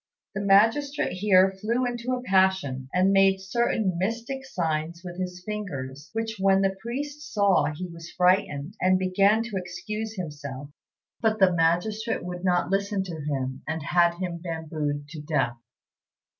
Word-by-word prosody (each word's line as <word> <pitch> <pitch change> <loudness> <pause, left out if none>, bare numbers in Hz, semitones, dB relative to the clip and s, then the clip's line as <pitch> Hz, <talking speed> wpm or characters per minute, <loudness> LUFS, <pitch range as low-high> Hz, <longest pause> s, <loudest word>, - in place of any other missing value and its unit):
The 195 - -3
magistrate 225 +9 +3
here 190 0 +4
flew 235 +4 +1
into 245 +1 -2
a 250 0 -2
passion, 190 - +2
and 185 +2 +3
made 195 0 +4
certain 195 -2 0
mystic 230 +7 -2
signs 170 -6 -2
with 175 0 -7
his 180 -1 -4
fingers, 145 -10 -5
which 225 0 -3
when 195 0 +4
the 195 0 +1
priest 285 +5 -5
saw 200 -3 +3
he 165 +5 -5
was 170 -2 -9
frightened, 180 -4 +1
and 185 0 +4
began 195 +4 +3
to 225 -4 -4
excuse 210 +5 -5
himself; 145 -6 -6 0.5
but 220 -1 +2
the 190 -3 +5
magistrate 175 +7 0
would 180 0 -6
not 180 0 +1
listen 200 0 0
to 180 -3 -6
him, 135 -3 -3
and 160 -1 -3
had 170 +3 +3
him 175 -1 -4
bambooed 155 -4 -3
to 155 -1 -7
death. 135 -6 0
185 Hz, 155 wpm, -26 LUFS, 165-210 Hz, 0.5 s, the